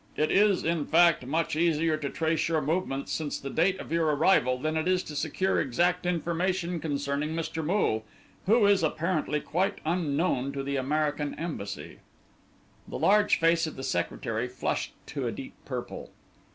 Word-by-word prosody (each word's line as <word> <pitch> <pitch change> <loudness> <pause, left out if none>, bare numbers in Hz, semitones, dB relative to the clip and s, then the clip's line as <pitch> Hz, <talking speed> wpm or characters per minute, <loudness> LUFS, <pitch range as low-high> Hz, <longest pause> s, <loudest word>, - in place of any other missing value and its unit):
It 155 - +1
is, 200 -1 +4
in 165 -3 0
fact, 170 -5 +4
much 160 +2 0
easier 165 -1 +2
to 150 -2 -4
trace 160 +1 0
your 160 -1 +1
movements 150 -2 -2
since 155 -3 -2
the 140 - -6
date 185 +3 +2
of - - -8
your 165 -1 +2
arrival 145 -4 +3
than 155 +4 -2
it 160 +2 0
is 185 0 +2
to 150 - -8
secure 165 +6 0
exact 175 +7 +1
information 175 +1 -1
concerning 145 0 -2
Mr. 165 0 -3
Moole, 150 - +1 0.4
who 220 +1 +5
is 200 -2 +4
apparently 155 -1 0
quite 185 +4 -1
unknown 155 -4 0
to 135 -1 -3
the 140 +1 -2
American 145 +2 -1
Embassy." 150 - -6 0.9
The - - -5
large 210 +1 +4
face 165 0 +3
of 155 - -7
the 135 - -7
secretary 110 +5 -2
flushed 125 - -3
to - - -3
a - - -1
deep - - -8
purple. - - -6
160 Hz, 165 wpm, -28 LUFS, 145-175 Hz, 0.9 s, who